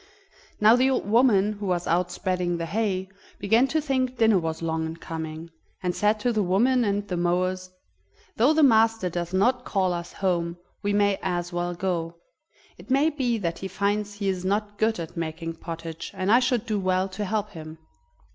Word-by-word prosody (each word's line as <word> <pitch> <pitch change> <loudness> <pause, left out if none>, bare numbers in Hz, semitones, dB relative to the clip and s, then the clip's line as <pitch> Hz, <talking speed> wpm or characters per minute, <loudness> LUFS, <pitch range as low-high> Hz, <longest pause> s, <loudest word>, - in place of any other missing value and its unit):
Now 215 +2 +7
the 255 +2 +3
old 255 -6 -1
woman, 215 -3 +4
who 205 -1 -6
was 175 -1 0
out 175 +1 +1
spreading 180 -1 -1
the 165 - -3
hay, 190 0 -1 0.3
began 225 +6 +3
to 315 - 0
think 260 -3 -1
dinner 220 -4 +4
was 160 -1 -4
long 160 0 -1
in 160 +1 -7
coming, 160 0 -6 0.3
and 180 -1 -1
said 210 +1 +2
to 245 +2 +1
the 215 - +1
women 235 +7 +3
and 205 -1 -1
the 180 - -3
mowers: 185 +1 0 0.7
"Though 245 +7 +4
the 315 - +4
master 225 -6 +4
does 175 0 -3
not 245 +7 +2
call 190 -5 0
us 175 0 -6
home, 175 -3 -1 0.2
we 205 -1 0
may 205 -1 +2
as 175 0 -2
well 175 0 -2
go. 170 -2 -2 0.6
It - - -14
may 280 +5 +3
be 255 -6 0
that 170 -5 -3
he 190 - -4
finds 205 +2 -1
he 205 -1 -3
is 185 -2 -1
not 205 +2 -1
good 220 -2 +1
at 165 -2 -6
making 165 0 -4
pottage 165 -1 -7
and 185 +2 0
I 235 - +7
should 245 -3 0
do 215 -2 -1
well 185 0 +1
to 195 +2 -5
help 210 +1 -2
him." 155 -3 -9
190 Hz, 195 wpm, -25 LUFS, 175-220 Hz, 0.7 s, Now